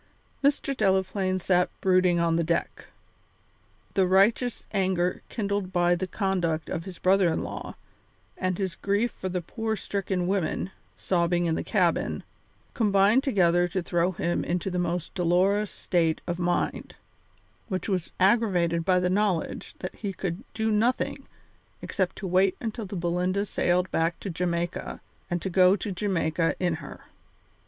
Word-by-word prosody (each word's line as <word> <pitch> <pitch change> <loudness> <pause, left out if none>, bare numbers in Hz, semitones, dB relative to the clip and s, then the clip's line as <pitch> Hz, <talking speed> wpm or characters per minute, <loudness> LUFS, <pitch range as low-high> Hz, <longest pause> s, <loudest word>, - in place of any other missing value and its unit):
Mr. 280 -1 +2
Delaplaine 190 -2 +1
sat 180 0 +2
brooding 185 -2 +3
on 165 -1 +2
the 170 - +2
deck. 170 +1 -2 1.1
The 190 -2 +3
righteous 215 +6 +2
anger 185 -3 0
kindled 200 -3 -2
by 175 -1 +3
the 180 +2 -1
conduct 175 -5 -1
of 165 -1 -3
his 185 -3 -8
brother 185 -2 +3
in - - -1
law, - - -6 0.6
and 185 -1 -1
his 190 -3 -2
grief 205 +6 0
for 185 - -5
the 180 -1 -3
poor 225 +4 -3
stricken 195 -3 -2
women, 185 0 -1 0.3
sobbing 175 -1 +1
in 165 - +1
the - - -2
cabin, - - 0 0.5
combined 205 +2 +4
together 175 - +3
to 180 +1 -2
throw 175 +1 +1
him 175 0 -1
into 180 +2 -2
the 180 - -1
most 175 -1 -2
dolorous 190 +4 +2
state 165 -3 0
of 175 0 -3
mind, 175 0 -1 0.7
which 185 -3 -3
was 185 -5 -1
aggravated 185 -5 +3
by 185 +1 +3
the 180 - +1
knowledge 190 -2 -1
that 185 - -5
he 200 -3 -5
could 185 +2 -4
do 220 0 0
nothing 230 +4 0 0.6
except 185 -3 -1
to 195 - -7
wait 185 +1 +2
until 225 -2 -4
the 195 - -6
Belinda 180 +3 0
sailed 180 -2 0
back 165 +1 0
to 195 - -4
Jamaica 170 0 -2 0.3
and 175 - -1
to 190 - -1
go 185 +1 +6
to 205 +1 -4
Jamaica 175 -4 0
in 180 -2 +1
her. 145 - -10
185 Hz, 155 wpm, -27 LUFS, 175-200 Hz, 1.1 s, go